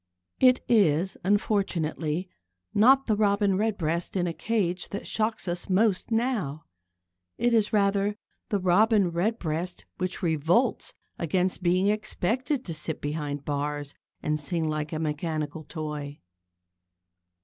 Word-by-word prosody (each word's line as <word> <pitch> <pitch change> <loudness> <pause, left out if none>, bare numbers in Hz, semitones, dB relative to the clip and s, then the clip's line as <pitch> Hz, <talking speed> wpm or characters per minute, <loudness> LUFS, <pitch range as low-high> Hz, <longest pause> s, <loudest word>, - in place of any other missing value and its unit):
It 255 -1 +5
is, 190 -5 +3
unfortunately, 185 -5 0 0.5
not 265 +6 +5
the 215 - +2
Robin 200 -1 +2
Redbreast 185 -6 -1
in 180 -2 +1
a 170 - -2
cage 185 -3 -1
that 200 - -5
shocks 220 -2 -1
us 175 +2 -3
most 195 0 +2
now. 225 - -1 0.7
It 240 0 +2
is 220 -2 +3
rather 200 -1 +2 0.3
the 205 - +1
Robin 195 +1 +4
Redbreast 175 -2 -2
which 185 +1 -2
revolts 170 - +1 0.2
against 180 +3 0
being 185 +3 +3
expected 240 +6 -1
to 170 - -4
sit 155 0 -3
behind 145 -1 -4
bars 145 0 -3 0.3
and 150 0 0
sing 160 +2 -1
like 155 -1 -2
a 160 - -2
mechanical 155 0 -3
toy. 150 -2 -5
180 Hz, 125 wpm, -27 LUFS, 155-210 Hz, 0.7 s, It